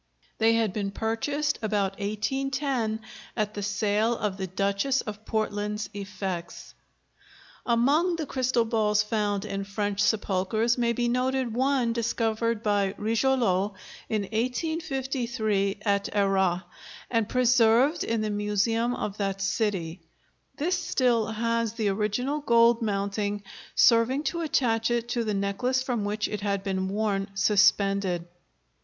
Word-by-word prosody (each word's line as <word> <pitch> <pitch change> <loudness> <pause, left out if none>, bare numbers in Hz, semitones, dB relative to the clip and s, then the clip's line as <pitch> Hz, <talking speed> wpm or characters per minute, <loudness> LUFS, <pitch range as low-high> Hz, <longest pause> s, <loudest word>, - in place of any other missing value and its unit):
They 225 0 +4
had 225 -4 +1
been 200 -2 -2
purchased 255 +9 -1
about 205 -3 -1
1810 240 +2 -1 0.4
at 210 -1 -1
the 205 - -4
sale 210 +3 +1
of 205 -3 -2
the 190 -1 -3
Duchess 200 +8 0
of 215 0 -8
Portland's 210 -1 -2
effects. 195 -3 -6 0.9
Among 285 +10 +3
the 325 -2 -3
crystal 255 -3 +1
balls 210 -2 +2
found 210 -2 -1
in 195 0 -3
French 205 0 -2
sepulchres 215 +2 +1
may 235 -1 +1
be 240 +1 0
noted 255 0 0
one 255 -1 +1
discovered 230 -1 -1
by 200 -2 +1
Rigollot 220 -3 +1 0.4
in 215 -2 0
1853 250 - -1
at 200 -1 +1
Arras, 190 -3 +2 0.5
and 230 -3 +1
preserved 250 +3 +4
in 230 -1 -1
the 215 -1 -1
Museum 210 +4 0
of 205 0 -4
that 195 -1 -2
city; 195 -4 -1 0.6
this 345 +5 0
still 240 -4 +1
has 230 0 -1
the 220 -3 0
original 215 +8 -1
gold 235 -3 +4
mounting 205 -1 -1 0.3
serving 240 +5 +4
to 340 +2 -2
attach 230 -7 +1
it 240 0 -1
to 240 -1 0
the 215 -2 -1
necklace 245 +7 0
from 240 -5 -2
which 210 +1 -1
it 210 -1 -4
had 200 -1 -1
been 190 -1 -1
worn 200 -1 -1
suspended. 195 -3 +2
220 Hz, 130 wpm, -27 LUFS, 200-240 Hz, 0.9 s, They